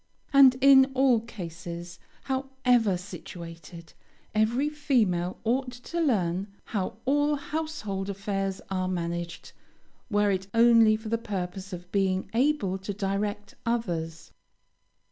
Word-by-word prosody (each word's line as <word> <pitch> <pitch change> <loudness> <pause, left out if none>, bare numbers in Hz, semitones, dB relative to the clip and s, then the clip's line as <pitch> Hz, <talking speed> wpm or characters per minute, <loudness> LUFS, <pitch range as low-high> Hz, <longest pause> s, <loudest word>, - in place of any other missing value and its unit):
And 270 -2 +8
in 270 0 +7
all 260 -3 +4
cases, 170 -5 -8 0.2
however 260 -6 +1
situated, 170 -2 -10 0.4
every 230 +6 +2
female 225 - 0
ought 250 +3 0
to 250 +8 -4
learn 195 - +1 0.2
how 200 -1 -3
all 290 +2 +2
household 280 -10 -4
affairs 195 -1 -3
are 185 -1 0
managed, 170 -1 -4 0.6
were 205 -2 +2
it 190 0 -2
only 230 -2 +6
for 220 0 -6
the 230 0 0
purpose 190 -2 -5
of 180 0 -8
being 190 -1 0
able 235 -7 +1
to 190 +1 -5
direct 205 +1 -2
others. 170 -9 -3
205 Hz, 115 wpm, -27 LUFS, 185-250 Hz, 0.6 s, And